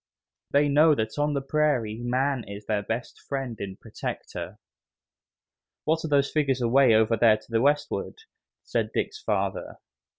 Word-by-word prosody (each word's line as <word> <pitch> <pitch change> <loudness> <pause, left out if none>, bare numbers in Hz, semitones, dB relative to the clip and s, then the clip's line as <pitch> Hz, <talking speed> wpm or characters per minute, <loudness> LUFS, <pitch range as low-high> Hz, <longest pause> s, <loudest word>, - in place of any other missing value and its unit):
They 145 +1 +3
know 150 +2 +5
that 110 +3 -3
on 145 0 +1
the 140 - -1
prairie 135 -7 0
man 130 +1 0
is 100 +1 -8
their 105 -2 0
best 115 +4 -5
friend 135 -4 -3
and 95 -1 -6
protector. 90 +4 -6 1.3
"What 160 +1 0
are - - -2
those 140 -1 +2
figures 140 -4 +1
away 125 0 +4
over 110 +1 +3
there 110 0 +5
to - - -19
the 115 0 +2
westward?" 145 +2 0 0.5
said - - -1
Dick's 430 - -2
father. - - -2
130 Hz, 155 wpm, -26 LUFS, 110-145 Hz, 1.3 s, know